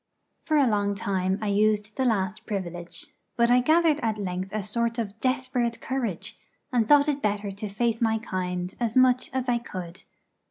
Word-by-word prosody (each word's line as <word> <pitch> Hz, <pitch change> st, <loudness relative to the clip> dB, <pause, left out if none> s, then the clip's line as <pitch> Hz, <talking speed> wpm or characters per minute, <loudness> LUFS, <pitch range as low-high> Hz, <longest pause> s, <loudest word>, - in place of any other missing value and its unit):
For 310 Hz, -1 st, +2 dB
a 285 Hz, -, +5 dB
long 205 Hz, -3 st, +1 dB
time 190 Hz, -1 st, -1 dB
I 210 Hz, -, 0 dB
used 210 Hz, +1 st, +1 dB
the 265 Hz, -, 0 dB
last 210 Hz, -3 st, -1 dB
privilege; 175 Hz, -4 st, -5 dB, 0.3 s
but 235 Hz, 0 st, +4 dB
I 250 Hz, -, +6 dB
gathered 315 Hz, +3 st, +3 dB
at 225 Hz, -3 st, -1 dB
length 185 Hz, -1 st, -3 dB
a 215 Hz, -1 st, -2 dB
sort 235 Hz, +3 st, -1 dB
of 220 Hz, -2 st, -4 dB
desperate 255 Hz, -2 st, 0 dB
courage, 240 Hz, -9 st, -3 dB, 0.3 s
and 230 Hz, -3 st, +2 dB
thought 290 Hz, +2 st, +6 dB
it 290 Hz, -1 st, 0 dB
better 205 Hz, -1 st, -1 dB
to 200 Hz, +2 st, -6 dB
face 230 Hz, +3 st, -1 dB
my 225 Hz, -1 st, +2 dB
kind 180 Hz, -4 st, -3 dB
as 235 Hz, 0 st, 0 dB
much 255 Hz, 0 st, +4 dB
as 260 Hz, -1 st, -2 dB
I 240 Hz, -1 st, +2 dB
could. 185 Hz, -5 st, -8 dB
220 Hz, 185 wpm, -26 LUFS, 200-245 Hz, 0.3 s, I